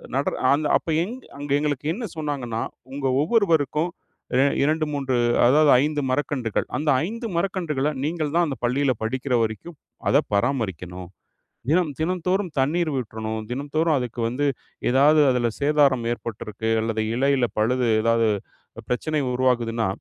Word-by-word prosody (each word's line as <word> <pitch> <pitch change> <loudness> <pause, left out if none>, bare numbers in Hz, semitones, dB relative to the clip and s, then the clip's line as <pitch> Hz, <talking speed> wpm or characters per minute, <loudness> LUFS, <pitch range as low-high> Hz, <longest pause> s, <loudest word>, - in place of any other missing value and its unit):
நடர 135 +1 0 0.2
அந்த 150 +1 +1
அப்ப - - -18 0.2
எங் 225 +7 -5 0.2
அங்க 145 0 -6
எங்களுக்கு 145 -1 -2
என்ன 230 +5 -5
சொன்னாங்கன்னா, 135 -7 -3 0.3
"உங்க 140 0 -4 0.2
ஒவ்வொருவருக்கும் 165 - +2 0.5
ரெ 130 - +5 0.2
2, 155 +2 +1
3, 135 -3 -1 0.3
அதாவது 145 +4 +5
5 150 0 -1
மரக்கன்றுகள், 130 -5 -1
அந்த 150 +1 -1 0.2
5 230 +5 -5
மரக்கன்றுகள 170 -6 -1
நீங்கள் 155 -1 -2
தான் 175 - +4
அந்த 135 -4 -4
பள்ளியில 130 +3 +2
படிக்கிற 130 +3 -2
வரைக்கும் 115 - -4 0.3
அத - - +5 0.2
பராமரிக்கணும். 95 - -2 0.6
தினம் 165 -2 +2
தினந்தோறும் 180 +2 -1
தண்ணீர் 155 +4 +1
விட்றணும், 110 -2 -4
தினந்தோறும் 145 +5 0
அதுக்கு 125 -1 -4
வந்து 135 +5 -1 0.5
எதாவது 150 +4 +5
அதில 125 -2 +1
சேதாரம் 140 -4 +3
ஏற்பட்ருக்கு, 110 -1 -5
அல்லது 110 -1 -1
இலைல 135 -1 +2
பழுது 125 +3 +1
ஏதாவது, 115 0 +2 0.6
பிரச்சனை 150 +5 0
உருவாகுதுன்னா, 120 -3 +1
140 Hz, 130 wpm, -23 LUFS, 120-155 Hz, 0.6 s, ரெ